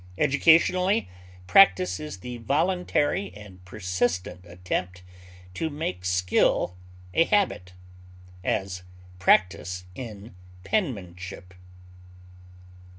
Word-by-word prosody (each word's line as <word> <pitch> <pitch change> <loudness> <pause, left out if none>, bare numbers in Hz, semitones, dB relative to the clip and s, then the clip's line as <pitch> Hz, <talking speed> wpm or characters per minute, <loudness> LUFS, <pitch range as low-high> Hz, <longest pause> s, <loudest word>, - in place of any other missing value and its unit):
Educationally, 170 +7 +3 0.4
practise 185 - +5
is 150 -12 -7
the 125 +2 -6
voluntary 145 - 0
and 100 -3 -13
persistent 90 -1 -2
attempt 90 0 -4 0.5
to 160 - -2
make 120 - -4
skill 90 0 +1 0.4
a 165 - +4
habit; 165 - 0 0.7
as, 95 -2 -2 0.4
practise 90 -1 +2
in 110 -2 -9 0.3
penmanship. 95 - -3
100 Hz, 80 wpm, -26 LUFS, 90-155 Hz, 0.7 s, practise